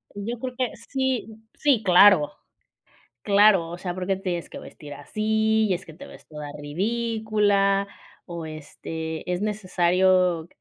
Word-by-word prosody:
Yo 225 +4 -5
creo 255 0 -5
que 255 -3 -1 0.2
sí, 265 -3 -1 0.3
sí, 270 -7 +1
claro. 180 -4 +6 0.9
Claro, 200 -4 +4
o 175 - -7
sea, 180 -1 -4
¿por 185 +1 -5
qué 195 - +1
te 190 - -11
tienes 175 -3 -3
que - - -9
vestir 145 -2 -11
así? 220 +7 0
Y - - +2
es 175 - -5
que 160 - -12
te 160 - -12
ves - - -15
toda 150 -1 -8
ridícula, 205 +3 0 0.4
o 170 -2 -7
este, 160 +1 -7
¿es 180 +1 -2
necesario 185 -4 +1
190 Hz, 155 wpm, -24 LUFS, 170-215 Hz, 0.9 s, claro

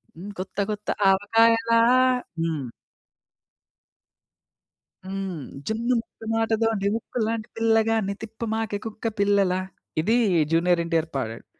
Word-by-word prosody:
హ్మ్. 185 +5 -8
కొత్త 190 +2 -7
కొత్త 210 0 -5 0.2
ఆవకాయలా.' 230 +3 +3 0.6
హ్మ్. 155 -7 -2 2.3
హ్మ్. 190 -3 -4 0.3
'జున్ను 230 +3 0
ముక్క 225 - -15
మాటతోటి 225 -2 +1
ఉక్కు 235 +2 -6
లాంటి 225 -1 -3
పిల్లగాన్ని 225 -2 +2
తిప్పమాకే 220 -1 -3
కుక్క 225 +1 -4
పిల్లలా.' 200 -2 +2 0.4
ఇది 215 +8 +2 0.4
'జూనియర్ 170 +1 +3
ఎన్టీఆర్' 165 -1 0
పాడాడు. 115 -3 -4
210 Hz, 100 wpm, -24 LUFS, 185-225 Hz, 2.3 s, ఆవకాయలా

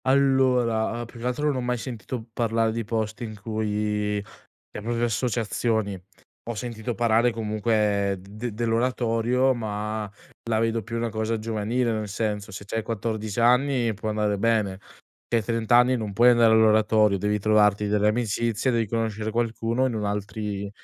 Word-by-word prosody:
Allora, 130 -4 +2
uhm, - - -5
più 115 0 -13
che 120 - -3
altro 125 +4 -1
non 145 -3 +1
ho - - -1
mai 125 0 -1
sentito 115 -1 -6
parlare 115 -1 +1
di 115 +1 -3
posti 110 +1 -3
in 110 -2 -7
cui, 105 0 -1 0.6
le - - -7
proprie 120 +1 -1
associazioni 110 -3 -1 0.5
ho 120 - -4
sentito 115 +1 -4
parlare 115 +1 +3
comunque 105 -2 0
de 105 +5 -6
dell'oratorio, 120 +2 +1
ma 105 -2 -4 0.4
la 110 - +2
vedo 115 0 0
più 115 +3 -5
una 115 0 -1
cosa 110 +1 -2
giovanile, 115 +2 -1
nel 110 -1 -3
senso 105 0 -3
se 95 +2 -8
c'hai 115 +2 -2
14 110 -1 -3
anni 125 -1 +3
può 110 +2 -4
andare 105 -1 0
bene, 105 -3 0 0.5
hai 115 -2 +1
30 115 +1 +2
anni 125 +1 +4
non 105 -3 -4
puoi 120 +5 +6
andare 120 -2 +5
all'oratorio, 110 -2 +4
devi 105 +2 0
trovarti 105 0 +3
delle 105 0 +2
amicizie, 115 +2 0
devi 115 -2 +1
conoscere 110 -1 -2
qualcuno 115 +2 0
in 125 - -3
un 105 -1 -2
altri 105 0 -3
in 100 - -5
110 Hz, 165 wpm, -25 LUFS, 105-120 Hz, 0.6 s, puoi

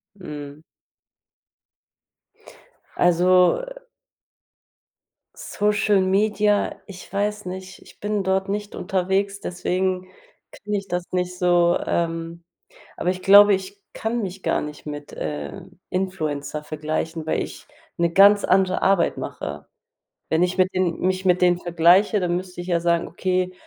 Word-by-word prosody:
Mhm. 150 -4 -9 2.4
Also, 180 - +4
äh - - -11 1.5
Social 210 -1 +1
Media, 205 +2 +1
ich 185 -2 -11
weiß 205 0 -2
nicht, 185 +1 -8
ich - - -18
bin 205 -1 -1
dort 190 +1 0
nicht 205 0 -4
unterwegs, 195 +2 -1
deswegen 185 +1 -2 0.5
kenne 210 0 -4
ich 195 0 -6
das 180 0 -2
nicht 180 0 -2
so. 175 -1 +3
Ähm, 165 0 -2 0.5
aber 180 - -2
ich 185 0 -2
glaube, 205 +2 +8
ich 195 +1 -4
kann 230 +1 -2
mich 190 0 -6
gar - - +1
nicht 150 0 -8
mit, 145 -1 -7
äh, 75 -2 -5 0.3
Influencer 155 -6 -3
vergleichen, 155 +1 -4
weil 160 - 0
ich - - -10 0.3
'ne 170 -1 +1
ganz 200 +2 +6
andere 185 0 +2
Arbeit 195 -3 +2
mache. - - -6 0.6
Wenn 160 +2 +2
ich 180 +1 0
mit 185 +1 +3
den 185 -2 0
mich 185 +1 0
mit 180 0 +2
denen 175 -1 +4
vergleiche, 175 +5 +3
dann 175 -1 0
müsste 180 -1 -6
ich 175 - -7
ja 170 -1 +1
sagen: 170 0 +1
„Okay, 185 +1 -1
185 Hz, 135 wpm, -23 LUFS, 170-195 Hz, 2.4 s, glaube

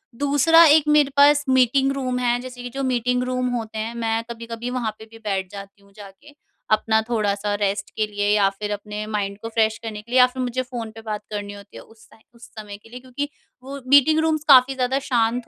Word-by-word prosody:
दूसरा, 290 +5 +4
एक 310 0 +6
मेरे 300 -2 +4
पास 290 +1 +5
मीटिंग 260 +1 +3
रूम 255 -2 -3
है, 245 -1 0
जैसे 250 -1 -9
कि 245 - -6
जो 275 - -3
मीटिंग 250 -1 0
रूम 255 0 -2
होते 220 -2 -5
हैं, 220 +2 -4
मैं 225 -1 -1
कभी-कभी 230 0 -6
वहाँ 245 -3 -2
पे 220 - -11
भी 225 - -13
बैठ 190 -3 -2
जाती 200 0 -11
हूँ 200 0 -24
जाके। 205 +7 -14 0.4
अपना 220 +1 +2
थोड़ा-सा 205 -3 -1
रेस्ट 200 0 -1
के 215 - 0
लिए 205 -1 -2
या 200 -2 +3
फिर 205 +1 -6
अपने 210 +1 -5
माइंड 200 -2 -3
को 225 - -6
फ्रेश 220 -1 +1
करने 215 -2 -6
के 230 +3 -18
लिए, 255 - +4
या 250 - +8
फिर 255 +1 -7
मुझे 250 +1 -2
फ़ोन 240 -3 -7
पे 225 - -10
बात 215 -2 -5
करनी 205 -1 -5
होती 200 0 -13
है, - - -9
उस 225 0 -21
टाइम 220 - -21
उस 235 - -14
समय 210 -2 -10
के 210 - -20
लिए, 245 +2 -9
क्योंकि 260 +3 -5 0.3
वो 275 +2 -8
मीटिंग 285 +3 +5
रूम्स 315 -1 0
काफ़ी 265 -1 +6
ज़्यादा 260 +1 0
शांत 235 -1 0
235 Hz, 230 wpm, -22 LUFS, 210-255 Hz, 0.4 s, या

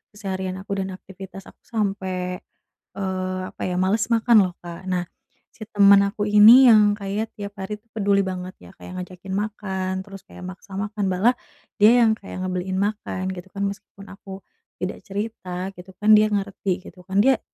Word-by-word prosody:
keseharian 190 -2 -4
aku 195 +1 -4
dan 190 - -4
aktivitas 190 0 -11
aku - - -17
sampe, 190 -4 -2 0.5
eee, 185 -1 -3
apa - - -15
ya, 180 - -2
males 195 +4 +2
makan 230 0 +5
loh 175 - -15
Kak. 175 +2 -8
Nah 180 -1 0 0.5
si 220 - -9
temen 200 -1 +7
aku 205 +1 -2
ini 220 +5 +9
yang 210 -2 +6
kayak 205 +3 -3
tiap 200 -1 -7
hari 210 +2 -5
tuh 225 - -41
peduli 200 -2 +2
banget 185 -1 -4
ya, - - -14
kayak 185 0 -8
ngajakin 185 +1 -11
makan, 195 -2 -3
terus 195 0 -11
kayak - - -12
maksa 190 +1 -10
makan, 205 0 -2
malah 190 +7 +3 0.5
dia 235 +4 +7
yang 220 - +4
kayak 185 -2 -7
ngebeliin 185 0 -2
makan 200 -2 -2
gitu 185 0 -8
kan, 200 - -2
meskipun 200 0 -9
aku 195 -1 -10 0.4
tidak 185 - -3
cerita 195 -3 -4
gitu 180 +2 -12
kan, 210 +1 +4
dia 215 0 +6
ngerti 195 -2 -2
gitu 180 - -13
kan 195 +1 +1
dia 265 0 +4
195 Hz, 180 wpm, -23 LUFS, 185-210 Hz, 0.5 s, ini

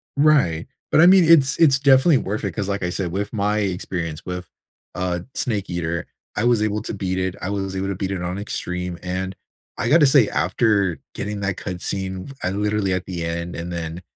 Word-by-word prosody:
Right. 140 - +3 0.2
But, - - +6
I - - +8
mean, 185 -1 +7
it's 155 -5 +5
it's 140 -6 +5
definitely 135 +2 +5
worth 105 +3 -3
it, 95 - -2
'cause, 100 +3 -3
I 100 -3 -1
said, 90 -1 -3
with 100 +3 -3
my 105 0 +1
experience 90 -5 -3
with, 90 -1 -5 0.5
uh, 90 -1 -1 0.2
Snake 105 -5 -1
Eater, 85 -1 -2 0.3
I 105 - 0
was 120 -3 +3
able 105 -1 0
to - - -4
beat 95 -2 -2
it; 95 0 -1
I 90 - -3
was 95 -1 -3
able 95 0 -2
to 100 - -2
beat 95 +1 -3
it 95 -2 -3
on 90 +1 -3
extreme, 90 -3 -4
and, 95 +1 -3 0.4
I 120 - -1
gotta 150 +1 +6
say, 135 -5 +5
after 100 -2 +1
getting 105 0 -4
that 95 -1 -1
cutscene, 95 +4 -4
I 90 - 0
literally 105 -1 0
at 90 0 -2
the 85 -3 -4
end, 85 +1 -4
and 85 +1 -5
then 85 0 -5
95 Hz, 205 wpm, -22 LUFS, 90-105 Hz, 0.5 s, I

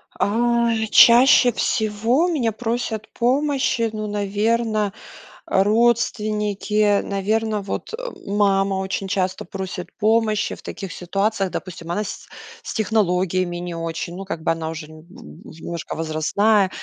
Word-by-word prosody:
А, 235 +2 +1 0.2
чаще 245 +3 +7
всего 225 +7 +1
у - - +1
меня 260 -10 0
просят 225 -1 -3
помощи, 260 -2 +1
ну, 215 0 -4
наверно, 210 +1 0 0.5
родственники. 210 -1 +1
Наверно, 210 +2 -1
вот 200 - -5 0.3
мама 195 -1 +2
очень 190 0 -3
часто 185 -1 -1
просит 185 0 -6
помощи 215 -1 +1
в - - -11
таких 195 -4 -7
ситуациях. 195 +2 -1
Допустим, 170 -2 -7
она 210 +5 -1
с 205 - -8 0.3
с - - -6
технологиями 185 -5 0
не 175 0 -5
очень, 165 +1 -4
ну, 195 - -7
как 165 -4 -5
бы - - +2
она 165 -1 -3
уже 160 -1 -7
немножко 160 - -9
возрастная, 185 +6 +2
205 Hz, 120 wpm, -21 LUFS, 185-225 Hz, 0.5 s, чаще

